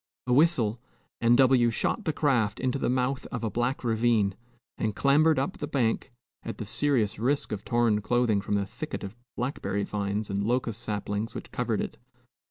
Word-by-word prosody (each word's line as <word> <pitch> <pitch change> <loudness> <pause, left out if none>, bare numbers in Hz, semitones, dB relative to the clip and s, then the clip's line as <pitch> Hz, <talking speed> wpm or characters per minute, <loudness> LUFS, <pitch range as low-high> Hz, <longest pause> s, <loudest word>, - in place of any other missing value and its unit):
A 125 - +1
whistle, 125 -7 +3 0.4
and 120 +1 +5
W 130 -3 +5
shot 200 - -1
the 160 - +2
craft 125 -8 +1
into 130 +1 0
the - - 0
mouth 130 +1 0
of 120 -2 -5
a 110 - -1
black 120 +3 -1
ravine, 110 -4 +2 0.4
and 110 -2 -1
clambered 150 +5 +4
up 135 +1 -1
the 145 - -3
bank, 125 -7 0 0.3
at - - -6
the - - -5
serious 130 -10 0
risk 140 +5 0
of 105 -2 -4
torn 120 -3 +2
clothing 120 -2 +2
from 105 - -1
the 100 -1 +1
thicket - - -6
of 100 +2 -7 0.2
blackberry 120 -5 -2
vines 100 0 -2
and 100 +1 -1
locust 120 -1 -1
saplings 105 +1 -3
which - - -7
covered 115 -3 -1
it. - - -5
120 Hz, 180 wpm, -28 LUFS, 105-130 Hz, 0.4 s, and